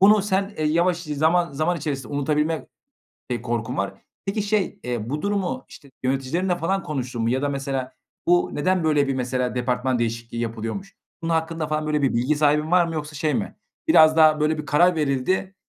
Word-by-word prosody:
bunu 205 +1 +6
sen, 195 0 0
eee, 155 - 0
yavaş 170 +3 +2
zaman 165 +1 +1
zaman 155 +5 0
içerisinde 140 -5 -4
unutabilme 150 +3 0 0.6
eee, 120 -2 -2
korkun 115 -1 -3
var. 100 0 -1 0.3
Peki 200 +2 -1
şey, 210 -2 0
eee, 120 -2 -3
bu 150 +2 -2
durumu, 200 +4 -1
işte, 140 - -14
yöneticilerinle 135 +8 0
falan 190 +2 -1
konuştun 125 -5 -3
mu 115 - +1
ya 130 +2 0
da 145 - 0
mesela 135 -2 -3 0.4
bu 175 0 +4
neden 185 +3 +1
böyle 150 -3 +3
bir, 135 - 0
mesela, 125 0 -1
departman 125 0 0
değişikliği 115 0 -3
yapılıyormuş? 115 - -4 0.3
Bunun 165 - -1
hakkında 160 -1 -1
falan 155 0 -1
böyle 150 -1 0
bir 135 - +2
bilgi 125 +6 +1
sahibin 150 +2 +2
var 180 -1 +5
mı 165 - -4
yoksa 155 -1 -5
şey 155 +1 0
mi - - -2 0.3
biraz 155 - +6
daha 155 -1 +6
böyle 155 +1 +1
bir 150 - -5
karar 170 +4 +4
verildi, 155 +7 0
150 Hz, 190 wpm, -23 LUFS, 130-175 Hz, 0.6 s, bunu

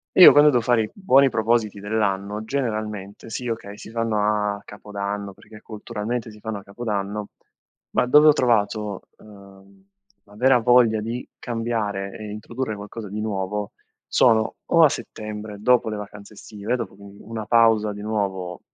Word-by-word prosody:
Io, 185 - +11
quando 145 +1 +7
do 125 -4 +2
fare 115 -1 +2
i 105 - -5
buoni 140 -9 +4
propositi 110 -2 0
dell'anno, 105 0 -2
generalmente 110 -5 -4
sì, 125 +2 -5
okay, 110 -3 -5
si - - -10
fanno 115 -2 -1 0.4
a - - -12
Capodanno, 100 -1 -5
perché 110 +3 -15
culturalmente 110 +1 -5
si 105 - -15
fanno 110 -1 -4
a 100 - -13
Capodanno, 105 -1 -4 0.6
ma 125 - +1
dove 150 +4 +6
ho 150 - +9
trovato, 105 -6 0 0.2
ehm, 100 -1 -17 0.4
la 100 - -19
vera 125 +3 +4
voglia 120 -2 +4
di 115 +3 -5
cambiare 110 -5 -3
e 110 - -8
introdurre 110 +2 -5
qualcosa 105 +1 -8
di 105 +2 -5
nuovo 105 -1 -3 0.4
sono 110 -3 +3
o 165 -1 +4
a 155 - +8
settembre, 105 -4 -7
dopo 125 0 +3
le 110 - -3
vacanze 105 0 -10
estive, 105 +3 -5
dopo, 115 -5 -4
quindi, 100 0 -14
una 110 -1 -6
pausa 110 -2 +4
di 105 - -9
nuovo 95 -5 -3
110 Hz, 160 wpm, -23 LUFS, 100-115 Hz, 0.6 s, Io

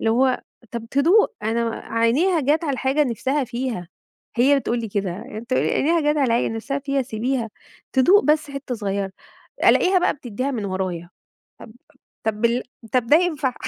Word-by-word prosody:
اللي 225 - +1
هو 255 +2 +2 0.3
طب 235 -1 -5
تدوق، 345 - +4
أنا 230 +2 0
و - - -3
عينيها 250 +13 +1
جات 300 +4 +1
على 285 - 0
الحاجة 265 +3 +1
نِفسها 265 +3 -1
فيها، 240 -7 -4 0.5
هي 275 +4 +4
بتقول 240 -2 -1
لي 225 - -4
كده. 200 -2 -2 0.2
أنت 235 0 -7
عينيها 330 +6 +2
جات 295 0 +1
على 250 -5 +2
الع - - -3
نِفسها 275 +5 -3
فيها 275 -1 -1
سيبيها 235 0 -2 0.4
تدوق 360 +11 +5
بس 300 -1 +2
حتّه 275 -2 -5
صغيرة، 200 -3 -2 0.5
ألاقيها 370 0 +5
بقى 355 - +1
بتدّيها 255 -1 -4
من 230 -6 -3
ورايا. 185 -3 -3 1.1
طب 220 - 0
طب 210 - -10
بال 235 +1 +2 0.3
طب 250 -2 +2
ده 300 +6 +7
ينفع؟ 305 -7 0
255 Hz, 170 wpm, -22 LUFS, 225-285 Hz, 1.1 s, ده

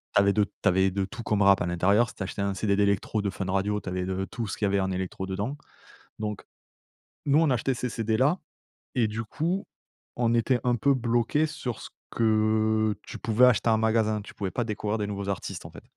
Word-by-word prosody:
Tu 100 - +7
avais 100 0 +3
de 105 - +3
tu - - -1
avais 95 +1 +3
de 95 +1 -1
tout 115 +4 -8
comme 105 -2 0
rap 100 0 +5
à - - +1
l'intérieur, 100 +7 +3
si - - -13
tu - - -11
achetais 95 - -4
un 100 0 0
CD 100 0 +1
d'électro 100 +1 +1
de 100 - 0
Fun 95 - -4
Radio, 100 +2 0
tu - - -6
avais 90 0 -2
de 95 +1 -2
tout 115 +3 -5
ce 100 - -5
qu'il 105 - 0
y - - +1
avait 100 0 +2
en 95 0 -1
électro 95 0 -3
dedans. 100 +9 -3 0.6
Donc, 105 -1 -4 0.8
nous 145 +1 +4
on 160 -2 +3
achetait 130 +2 +1
ces 125 +1 -3
CD 110 -1 -1
là 145 +9 +3 0.6
et 120 -4 +3
du 110 +1 -4
coup, 170 - -2 0.5
on 120 -1 +2
était 120 +2 +2
un 125 -1 +2
peu 140 +5 +3
bloqué 120 +4 +1
sur 135 -6 -5
ce - - -8 0.2
que 110 -1 +2
tu - - -8
pouvais 115 +2 +4
acheter 120 -1 +3
en 110 - +4
magasin, 110 -1 +2
tu 100 - -12
pouvais 95 -2 -4
pas 120 - -1
découvrir 105 0 -2
des 105 - -1
nouveaux 100 -1 -4
artistes, 100 - -4
en - - -9
fait. - - -12
110 Hz, 235 wpm, -27 LUFS, 100-120 Hz, 0.8 s, Tu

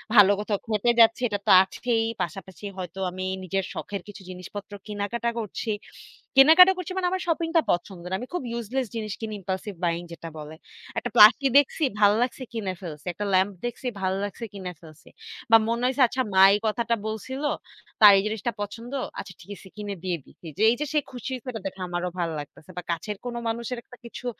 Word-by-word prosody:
ভালো 205 -2 +8
কোথাও 210 -1 -1
খেতে 215 +1 +1
যাচ্ছি 230 +2 +6
এটা 205 -1 -2
তো - - +6
আছেই 225 +3 -1 0.2
পাশাপাশি 190 +2 -6
হয়তো 185 0 -6
আমি 185 +1 -5 0.2
নিজের 195 +1 -1
শখের 200 -2 -5
কিছু 205 0 -10
জিনিসপত্র 185 +3 -8 0.2
কিনাকাটা 210 +3 -2
করছি। 220 +1 -4 0.7
কেনাকাটা 325 +7 +9
করছি 365 0 -5
মানে 370 -1 +1
আমার 375 0 -1
শপিংটা 330 0 +2
পছন্দের। 175 0 -3
আমি 245 - -6
খুব 360 - -1
ইউজলেস 235 +2 -2
জিনিস 215 -3 -3
কিনি 220 -1 -4
impulsive 190 +1 -5
buying 170 0 0
যেটা 165 0 -8
বলে। 150 +1 -8 0.4
একটা - - -2
প্লাকি 225 +6 +8
দেখছি, 285 +3 +3 0.2
ভাল্লাগছে 220 +6 +3
কিনে 205 -5 -2
ফেলছি। 155 -5 -8
একটা 205 +4 -4
ল্যাম্প 190 +2 +3
দেখছি 240 +2 -4
ভাল্লাগছে 195 +4 -2
কিনে 190 -3 -6
ফেলছি। 160 -2 -15 0.4
বা 225 - +10
মনে 235 +1 -1
হইছে 265 +2 0
আচ্ছা 260 +2 -2
মা 190 0 +7
এই 205 - +2
কথাটা 235 +2 0
বলছিল 255 +6 -5 0.6
তার 210 -1 +11
এই 195 - +2
জিনিসটা 220 +2 -2
পছন্দ। 230 +4 -6 0.3
আচ্ছা 185 - -7
ঠিক - - -16
আছে 190 - -14
কিনে 205 -1 -4
দিয়ে 180 -2 -1
দিছি। 170 - -15 0.2
এই - - +1
যে 300 - -1
সে 305 - +4
খুশি 250 +1 -6
হইছে 250 -4 -4
দেখে 190 0 -8
আমারও 175 0 -2
ভাল 170 -1 0
লাগতেছে। 150 +4 -11
বা - - -2
কাছের 170 +6 -3
কোন 245 -1 -4
মানুষের 235 +2 -3
একটা 250 - -15
কিছু 235 +1 -9
210 Hz, 185 wpm, -25 LUFS, 190-240 Hz, 0.7 s, তার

